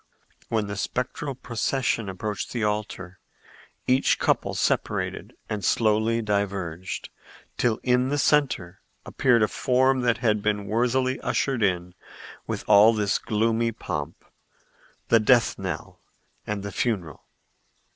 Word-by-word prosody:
When 110 Hz, -2 st, 0 dB
the 100 Hz, 0 st, -5 dB
spectral 130 Hz, +6 st, -3 dB
procession 120 Hz, -3 st, -1 dB
approached 100 Hz, +2 st, -4 dB
the 120 Hz, -3 st, -2 dB
altar, 105 Hz, -3 st, -3 dB, 0.7 s
each 130 Hz, +2 st, +3 dB
couple -, -, 0 dB
separated -, -, -1 dB
and 105 Hz, -2 st, -4 dB
slowly 110 Hz, +3 st, +2 dB
diverged, 95 Hz, -4 st, -3 dB, 0.5 s
till 115 Hz, -3 st, +1 dB
in 125 Hz, +1 st, +2 dB
the 145 Hz, -, 0 dB
centre 130 Hz, -, +1 dB, 0.2 s
appeared 120 Hz, -4 st, +2 dB
a -, -, +3 dB
form 130 Hz, +2 st, +2 dB
that 120 Hz, -1 st, +2 dB
had 110 Hz, -3 st, +1 dB
been 105 Hz, -1 st, -1 dB
worthily 125 Hz, +4 st, +1 dB
ushered 135 Hz, -4 st, -1 dB
in 90 Hz, -3 st, 0 dB, 0.5 s
with -, -, -3 dB
all 105 Hz, +2 st, +7 dB
this 105 Hz, -2 st, +1 dB
gloomy 115 Hz, +2 st, 0 dB
pomp, 75 Hz, -7 st, -6 dB, 0.8 s
the 115 Hz, -, +6 dB
death 115 Hz, +1 st, +3 dB
knell -, -, -5 dB, 0.5 s
and 105 Hz, -1 st, -3 dB
the 100 Hz, -, -5 dB
funeral. 95 Hz, -, -2 dB
110 Hz, 125 wpm, -25 LUFS, 100-125 Hz, 0.8 s, all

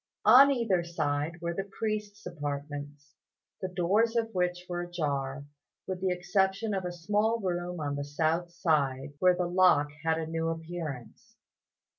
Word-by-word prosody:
On 255 Hz, +6 st, +9 dB
either 225 Hz, -10 st, +1 dB
side 160 Hz, -1 st, -2 dB
were 170 Hz, 0 st, -2 dB
the 195 Hz, +3 st, -4 dB
priest's 210 Hz, -2 st, -3 dB
apartments, 145 Hz, -2 st, -6 dB, 0.5 s
the 185 Hz, -, -1 dB
doors 195 Hz, +6 st, +1 dB
of 225 Hz, -1 st, 0 dB
which 180 Hz, -1 st, -1 dB
were 175 Hz, -1 st, -3 dB
ajar, 145 Hz, -5 st, -3 dB, 0.4 s
with 185 Hz, -1 st, -4 dB
the 190 Hz, -, +1 dB
exception 190 Hz, +4 st, 0 dB
of 190 Hz, -2 st, -2 dB
a 180 Hz, -, -2 dB
small 210 Hz, +6 st, 0 dB
room 175 Hz, -3 st, -3 dB
on 145 Hz, -2 st, -2 dB
the 145 Hz, -, -3 dB
south 160 Hz, +4 st, 0 dB
side, 145 Hz, -5 st, 0 dB
where 180 Hz, -1 st, +5 dB
the 180 Hz, 0 st, 0 dB
lock 175 Hz, -5 st, +4 dB
had 160 Hz, 0 st, +2 dB
a 160 Hz, -, -2 dB
new 165 Hz, 0 st, -2 dB
appearance. 165 Hz, -, -6 dB
175 Hz, 155 wpm, -29 LUFS, 150-190 Hz, 0.5 s, On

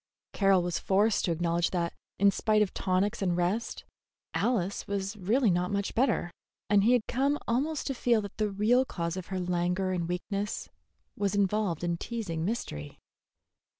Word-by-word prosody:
Carroll 195 Hz, -3 st, +4 dB
was 175 Hz, -1 st, -1 dB
forced 205 Hz, +3 st, +2 dB
to 175 Hz, -, 0 dB
acknowledge 170 Hz, +1 st, +1 dB
that, 170 Hz, -2 st, -1 dB, 0.2 s
in 200 Hz, 0 st, +5 dB
spite 215 Hz, +1 st, +2 dB
of 200 Hz, -, -4 dB
tonics 190 Hz, +2 st, 0 dB
and 180 Hz, -3 st, +1 dB
rest, 185 Hz, +6 st, -1 dB, 0.5 s
Alice 200 Hz, -6 st, 0 dB
was 200 Hz, 0 st, -2 dB
really 210 Hz, +4 st, +2 dB
not 180 Hz, +1 st, 0 dB
much 200 Hz, -1 st, -1 dB
better, 230 Hz, -8 st, +1 dB, 0.4 s
and 200 Hz, -1 st, +5 dB
he 235 Hz, +4 st, +5 dB
had 245 Hz, -3 st, +2 dB
come 275 Hz, +4 st, +1 dB
almost 280 Hz, +6 st, 0 dB
to 275 Hz, -, -1 dB
feel 240 Hz, -2 st, +2 dB
that 205 Hz, -, -8 dB
the 215 Hz, -1 st, +1 dB
real 215 Hz, +6 st, +3 dB
cause 170 Hz, -8 st, -3 dB
of 185 Hz, -2 st, -6 dB
her 190 Hz, -1 st, -3 dB
languor 180 Hz, +1 st, 0 dB
and 175 Hz, -2 st, -2 dB
weakness 200 Hz, +3 st, -3 dB, 0.5 s
was 200 Hz, 0 st, 0 dB
involved 200 Hz, -4 st, +1 dB
in 170 Hz, -1 st, 0 dB
teasing 185 Hz, -7 st, -4 dB
mystery. 75 Hz, -, -4 dB
195 Hz, 170 wpm, -29 LUFS, 175-215 Hz, 0.5 s, in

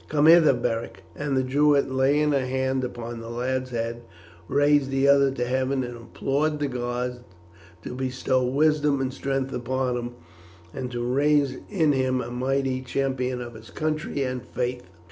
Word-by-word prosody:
Come 150 Hz, -1 st, +2 dB
hither, 160 Hz, -4 st, +7 dB
Beric;" 115 Hz, -5 st, -3 dB
and 145 Hz, -2 st, -1 dB
the 130 Hz, -, +2 dB
Druid, 140 Hz, +1 st, +3 dB
laying 145 Hz, +3 st, +2 dB
a 135 Hz, -2 st, +2 dB
hand 130 Hz, 0 st, -1 dB
upon 120 Hz, -1 st, -5 dB
the 115 Hz, 0 st, -8 dB
lad's 130 Hz, +2 st, -2 dB
head, 115 Hz, -1 st, -3 dB, 0.5 s
raised 145 Hz, +1 st, +3 dB
the 135 Hz, +1 st, +2 dB
other 140 Hz, -1 st, +5 dB
to 130 Hz, -2 st, -2 dB
heaven 130 Hz, +1 st, 0 dB
and 120 Hz, -1 st, -6 dB
implored 140 Hz, +6 st, -1 dB
the 145 Hz, -1 st, -1 dB
gods 125 Hz, -1 st, -3 dB, 0.6 s
to -, -, -6 dB
bestow 130 Hz, 0 st, 0 dB
wisdom 145 Hz, +2 st, +2 dB
and 130 Hz, -1 st, -2 dB
strength 135 Hz, -1 st, -2 dB
upon 125 Hz, +1 st, -1 dB
him, 120 Hz, 0 st, -5 dB, 0.6 s
and 130 Hz, -2 st, -4 dB
to 120 Hz, -1 st, -3 dB
raise 140 Hz, +1 st, +2 dB
in 165 Hz, -7 st, +2 dB
him 130 Hz, -2 st, +1 dB
a 120 Hz, -1 st, -5 dB
mighty 130 Hz, +1 st, -1 dB
champion 130 Hz, -1 st, -2 dB
of 120 Hz, -1 st, -7 dB
his 110 Hz, -1 st, -12 dB
country 155 Hz, +3 st, -2 dB
and 125 Hz, -1 st, -3 dB
faith. 125 Hz, -4 st, -4 dB
130 Hz, 165 wpm, -25 LUFS, 125-140 Hz, 0.6 s, hither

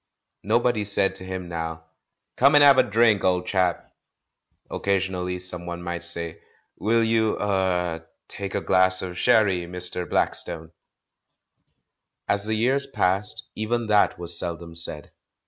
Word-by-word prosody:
Nobody 120 Hz, +1 st, +1 dB
said 100 Hz, -1 st, +3 dB
to -, -, -8 dB
him 95 Hz, -1 st, -6 dB
now, 80 Hz, -1 st, -5 dB, 0.5 s
"Come 140 Hz, +3 st, +4 dB
and 145 Hz, -, +7 dB
have 140 Hz, -2 st, +7 dB
a -, -, +9 dB
drink, 110 Hz, -2 st, +2 dB
old 90 Hz, -1 st, +1 dB
chap!" 90 Hz, -3 st, -1 dB, 0.8 s
Occasionally 95 Hz, -2 st, -1 dB
someone 85 Hz, -1 st, -5 dB
might 85 Hz, 0 st, -4 dB
say, 85 Hz, -1 st, 0 dB, 0.4 s
"Will 115 Hz, +2 st, +2 dB
you 110 Hz, -1 st, +1 dB
— -, -, -9 dB
er 90 Hz, -4 st, -1 dB
— -, -, -60 dB
take 100 Hz, -1 st, -6 dB
a 100 Hz, -, -1 dB
glass 95 Hz, 0 st, +3 dB
of 90 Hz, -1 st, -6 dB
sherry, 105 Hz, -7 st, +3 dB
INIr. 90 Hz, 0 st, -3 dB
Black -, -, +1 dB
stone 80 Hz, -2 st, -4 dB, 0.8 s
?" -, -, -54 dB
As 100 Hz, 0 st, 0 dB
the 110 Hz, 0 st, -1 dB
years 135 Hz, +5 st, 0 dB
passed, 100 Hz, -4 st, -1 dB
even 115 Hz, +2 st, -2 dB
that 105 Hz, -1 st, +2 dB
was 85 Hz, -1 st, -1 dB
seldom 85 Hz, -1 st, -6 dB
said. 80 Hz, -3 st, -7 dB
95 Hz, 150 wpm, -24 LUFS, 85-110 Hz, 0.8 s, a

